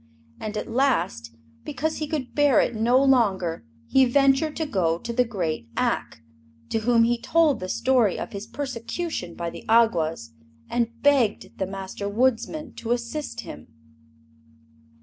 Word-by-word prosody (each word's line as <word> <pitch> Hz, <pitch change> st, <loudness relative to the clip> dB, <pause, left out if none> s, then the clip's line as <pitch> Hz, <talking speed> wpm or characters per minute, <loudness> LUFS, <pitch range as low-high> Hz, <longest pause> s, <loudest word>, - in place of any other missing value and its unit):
And 215 Hz, 0 st, -5 dB
at -, -, -4 dB
last, 225 Hz, -, 0 dB, 0.3 s
because 300 Hz, +3 st, -3 dB
he 305 Hz, -, -3 dB
could 290 Hz, -5 st, -4 dB
bear 290 Hz, -2 st, +4 dB
it -, -, +1 dB
no 235 Hz, +3 st, +3 dB
longer, 195 Hz, -, +2 dB, 0.2 s
he 265 Hz, -, +4 dB
ventured 275 Hz, +4 st, +3 dB
to 320 Hz, -, -2 dB
go 180 Hz, -, 0 dB
to 235 Hz, +7 st, -6 dB
the 250 Hz, -, +3 dB
great 170 Hz, -, -3 dB
Ak, 115 Hz, -, -1 dB, 0.5 s
to 225 Hz, -, +1 dB
whom 230 Hz, +1 st, +3 dB
he 235 Hz, +1 st, +1 dB
told 320 Hz, -4 st, +3 dB
the 185 Hz, -, -5 dB
story 245 Hz, -6 st, +2 dB
of -, -, -5 dB
his 200 Hz, +1 st, -7 dB
persecution 250 Hz, -, -4 dB
by 170 Hz, -1 st, -4 dB
the -, -, -10 dB
Awgwas, 165 Hz, -, +2 dB, 0.4 s
and 235 Hz, -1 st, -2 dB
begged 275 Hz, -7 st, +2 dB
the 190 Hz, -, -1 dB
Master 195 Hz, +1 st, -5 dB
Woodsman 260 Hz, +7 st, 0 dB
to 235 Hz, +1 st, -1 dB
assist 245 Hz, +5 st, -4 dB
him. 75 Hz, +1 st, -10 dB
235 Hz, 150 wpm, -24 LUFS, 190-270 Hz, 0.5 s, bear